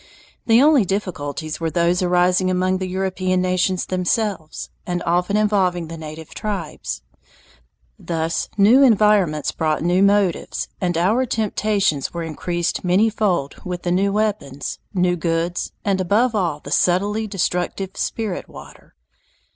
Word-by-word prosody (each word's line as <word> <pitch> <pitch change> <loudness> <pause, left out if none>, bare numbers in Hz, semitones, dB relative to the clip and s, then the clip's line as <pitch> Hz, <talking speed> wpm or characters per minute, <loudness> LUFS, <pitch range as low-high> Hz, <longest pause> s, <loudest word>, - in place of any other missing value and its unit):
The 230 +3 +6
only 295 -5 +5
difficulties 160 -6 -3
were 165 -1 -1
those 170 +2 +1
arising 180 +1 +2
among 185 0 +1
the 185 - -3
European 185 0 -1
nations 185 0 +1
themselves, 185 -2 -2
and 175 -1 -3
often 180 +4 +1
involving 185 -6 +1
the 165 - -6
native 155 0 -9
tribes. 175 - -5 1.0
Thus 165 -1 -2
new 220 +7 +6
environments 210 - +3
brought 155 -1 -1
new 175 +2 +2
motives, 200 -3 +1
and 175 -3 0
our 220 +9 +2
temptations 205 - 0
were 170 - -2
increased 170 +2 -2
manyfold 190 -5 +1
with 180 -1 -5
the 175 - -1
new 195 +3 +2
weapons, 200 -10 -2
new 180 -2 +1
goods, 170 +1 -2
and 195 -2 +1
above 220 +7 +2
all 175 -8 0
the 145 - -9
subtly 205 +7 +1
destructive 190 -1 -2
"spirit 215 -5 -3
water." - - -14
185 Hz, 130 wpm, -21 LUFS, 170-205 Hz, 1.0 s, The